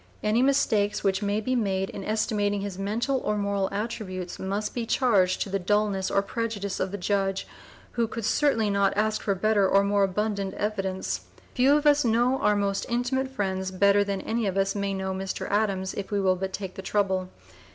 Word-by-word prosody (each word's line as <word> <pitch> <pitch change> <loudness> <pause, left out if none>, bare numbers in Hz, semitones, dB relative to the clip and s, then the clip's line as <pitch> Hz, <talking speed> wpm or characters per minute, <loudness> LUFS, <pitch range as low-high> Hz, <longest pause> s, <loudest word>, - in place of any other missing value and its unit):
Any 215 +3 +2
mistakes 240 -7 +2
which 195 0 +1
may 205 +1 0
be 255 +4 -1
made 195 -4 0
in 195 - -7
estimating 210 -1 0
his 195 -2 -5
mental 230 +7 0
or 210 -3 -1
moral 200 -1 0
attributes 200 -4 -4
must 200 +3 -2
be 235 -2 -3
charged 195 -9 +2
to - - -9
the 195 - 0
dulness 200 0 +1
or 200 - +2
prejudice 205 -2 -3
of 190 - 0
the 200 - -5
judge, 195 0 -1 0.5
who 235 -1 0
could 230 -1 -5
certainly 225 -5 +2
not 200 0 +2
ask 215 +1 +1
for 200 - 0
better 205 0 +2
or 195 0 +4
more 200 0 +2
abundant 200 0 -1
evidence. 195 -3 -2 0.3
Few 270 +3 +4
of 300 - -3
us 290 0 +5
know 240 +3 +2
our 210 - +3
most 200 -1 -1
intimate 245 +2 0
friends 190 -7 -2
better 200 +2 +4
than 200 -1 -3
any 225 -1 -1
of 195 0 -2
us 195 0 +1
may 200 -1 -2
know 190 0 -2
Mr. 190 0 -4
Adams, 195 -3 0
if 200 - -5
we 205 - 0
will 190 -1 +3
but 190 +1 -4
take 190 -2 -5
the - - -7
trouble. 190 -2 0
200 Hz, 200 wpm, -26 LUFS, 195-220 Hz, 0.5 s, us